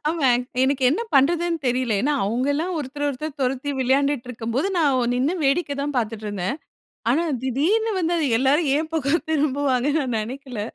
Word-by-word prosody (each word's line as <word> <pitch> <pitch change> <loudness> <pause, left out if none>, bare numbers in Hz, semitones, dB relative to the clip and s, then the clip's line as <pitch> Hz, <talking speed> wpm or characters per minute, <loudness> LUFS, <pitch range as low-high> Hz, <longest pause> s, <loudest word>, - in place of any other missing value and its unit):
ஆமா, 310 -5 +1 0.3
எனக்கு 270 0 +1
என்ன 320 - 0
பண்றதுன்னு 335 +5 +3
தெரியல. 250 -2 +1
ஏன்னா 290 +6 +1
அவுங்கல்லாம் 285 - -1
ஒருத்தர 290 +1 -3
ஒருத்தர் 300 +4 -5
தொரத்தி 265 +2 -1
விளையான்டுட்டு 265 0 +1
இருக்கும்போது, 240 +6 -2
நான் 260 -6 +2
நின்னு 275 +8 +1
வேடிக்கை 285 +1 +1
தான் 290 0 -3
பார்த்துட்டு 220 -2 -2
இருந்தேன். 205 +7 -2 0.5
ஆனா 320 +7 +2 0.2
திடீர்னு 365 - +1
வந்து 345 0 0 0.2
எல்லாரும் 280 +4 +2
ஏன் 315 +1 -2
பக்கம் 315 +1 0
திரும்புவான்கனு 285 -1 +1
நான் 250 -4 -2
நெனைக்கல. 250 0 -5
275 Hz, 150 wpm, -23 LUFS, 250-305 Hz, 0.5 s, பண்றதுன்னு